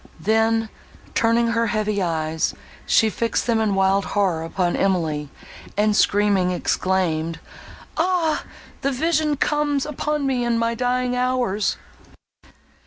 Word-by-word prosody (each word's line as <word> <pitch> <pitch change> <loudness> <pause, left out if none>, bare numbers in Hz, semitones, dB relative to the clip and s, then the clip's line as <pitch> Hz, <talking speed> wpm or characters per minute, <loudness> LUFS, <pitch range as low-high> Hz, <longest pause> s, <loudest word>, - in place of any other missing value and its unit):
Then, 225 +4 +1 0.4
turning 230 +1 +2
her 230 0 +1
heavy 215 -3 -1
eyes, 160 -2 -1 0.3
she 220 - +4
fixed 230 +2 -1
them, 230 -2 +1
in 215 -3 +1
wild 195 +1 +3
horror, 190 -6 0
upon 175 +1 -1
Emily, 160 -6 0 0.5
and, 210 0 +2
screaming, 200 -3 +3
exclaimed, 175 -3 -1 0.6
"Ah! 335 -2 +1 0.4
that 275 -1 0
vision 310 0 +1
comes 290 -1 0
upon 300 0 -2
me 260 -2 0
in 235 -1 +1
my 230 0 0
dying 250 +1 0
hours!" 250 -5 0
225 Hz, 120 wpm, -22 LUFS, 190-250 Hz, 0.6 s, she